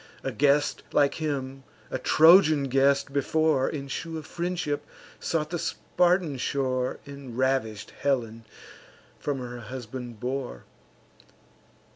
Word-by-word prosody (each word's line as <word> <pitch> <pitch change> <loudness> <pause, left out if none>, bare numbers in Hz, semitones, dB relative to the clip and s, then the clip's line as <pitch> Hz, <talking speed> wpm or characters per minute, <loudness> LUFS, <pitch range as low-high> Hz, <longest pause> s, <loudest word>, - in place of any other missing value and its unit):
A 135 - -2
guest 145 +4 +2
like 140 -1 +3
him, 135 -3 -3 0.3
a 130 - -2
Trojan 155 0 +6
guest 135 +1 +2
before, 145 0 +2
In 140 -2 -5
shew 165 +4 -4
of 155 - -7
friendship 175 -4 -2 0.4
sought 155 -2 -1
the 175 - -2
Spartan 175 -5 +1
shore, 130 -1 -1
And 140 -4 -9
ravish'd 130 -5 0
Helen 115 -5 -1 0.7
from 145 -2 -2
her 120 -1 -6
husband 120 0 -7
bore. 125 - -4
140 Hz, 115 wpm, -27 LUFS, 130-150 Hz, 0.7 s, Trojan